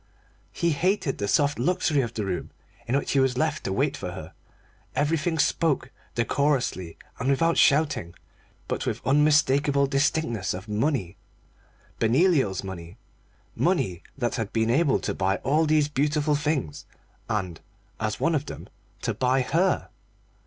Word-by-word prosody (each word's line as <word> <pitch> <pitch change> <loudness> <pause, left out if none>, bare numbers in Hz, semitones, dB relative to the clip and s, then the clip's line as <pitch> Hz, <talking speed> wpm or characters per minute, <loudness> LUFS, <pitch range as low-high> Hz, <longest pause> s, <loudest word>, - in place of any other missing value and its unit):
He 170 -1 0
hated 180 -1 0
the 100 - -1
soft 145 +5 +2
luxury 160 0 +2
of 120 -2 -4
the 105 - -2
room 95 -2 -3 0.4
in 125 +4 +2
which 140 - -2
he 140 - +3
was 130 -2 +2
left 155 +1 -1
to 95 - -1
wait 95 - 0
for - - -5
her. - - -9 0.6
Everything 160 +2 0
spoke, 160 -1 +1 0.2
decorously 125 - 0 0.2
and 125 - -1
without 165 +5 +2
shouting, 140 - +2 0.5
but - - -3
with - - -1
unmistakable 145 -1 +3
distinctness, 135 - 0
of 95 +3 -8
money, 105 - -1 0.8
Benoliel's 130 - +2
money: 90 0 -8 0.6
money 90 -3 0 0.2
that 120 -3 -1
had 115 -1 -3
been 110 0 +1
able 140 +1 +3
to - - -2
buy 95 0 0
all 155 +4 +2
these 155 -1 +3
beautiful 150 +1 +1
things, 145 - -2 0.4
and, 95 -6 -2 0.4
as 110 0 -2
one 165 - +2
of 150 -1 -1
them, - - -8 0.3
to - - 0
buy 130 +1 +1
her. 170 +8 +1
135 Hz, 145 wpm, -26 LUFS, 110-150 Hz, 0.8 s, he